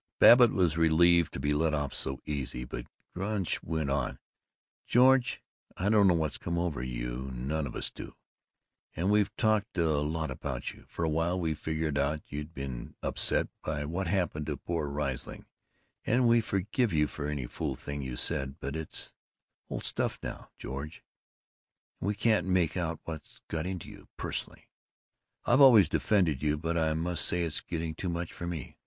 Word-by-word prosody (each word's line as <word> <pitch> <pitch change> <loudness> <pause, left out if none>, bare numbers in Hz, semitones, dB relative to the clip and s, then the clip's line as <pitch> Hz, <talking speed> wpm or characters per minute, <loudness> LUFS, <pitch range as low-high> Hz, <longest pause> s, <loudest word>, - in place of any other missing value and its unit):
Babbitt 120 0 +9
was 85 -5 +2
relieved 85 +1 +5
to - - -4
be 70 +2 0
let 75 +1 +2
off 70 -2 -2
so 65 0 -3
easily, 65 -4 -3
but - - -6 0.3
Gunch 95 0 -1
went 80 -4 -2
on: 70 - -1 0.7
"George, 125 0 +4 0.3
I 95 +3 +1
don't 105 -2 +6
know 90 - +5
what's 80 -3 -1
come 85 0 -2
over 85 -7 -1
you; - - -4
none 70 +4 -2
of - - -8
us - - -2
do; - - -9 0.8
and 90 +5 +1
we've 105 -1 +3
talked 110 -2 +1
a 80 -4 +2
lot 80 +2 -2
about - - -4
you. - - -17
For 85 - -3
a - - +1
while 85 +4 +1
we 80 -3 0
figured 80 -1 -2
out 75 +2 0
you'd 75 +2 -5
been 70 -5 -6
upset - - +1 0.2
by 75 -1 -2
what 85 +4 -2
happened 85 -5 0
to - - -2
poor 85 -4 -2
Riesling, 70 -2 -4 0.6
and 125 +1 +3
we 115 0 +5
forgave 105 +3 0
you 75 -1 +3
for 75 -1 -5
any 75 -4 -2
fool - - -3
things 70 0 -5
you 65 -1 -4
said, 65 +2 0
but 70 - -4
that's 80 -1 -4 0.6
old - - -4
stuff - - -1
now, - - -6
George, 70 +5 -6 1.0
and - - -3
we 105 - +1
can't 105 -4 +2
make 90 -4 +2
out 85 -3 -2
what's 80 -2 -8
got 80 +2 -2
into 90 -3 -4
you. - - -12
Personally, - - -4 0.8
I've 120 +4 +5
always 115 - +9
defended 85 -6 +2
you, 75 0 +1
but 85 +2 -2
I 80 -2 +2
must 85 +1 0
say 90 -1 +2
it's 80 -3 -1
getting 80 -1 -3
too 90 +3 -4
much 85 0 -3
for 85 - -6
me. 85 -6 -6
80 Hz, 180 wpm, -30 LUFS, 75-90 Hz, 1.0 s, Babbitt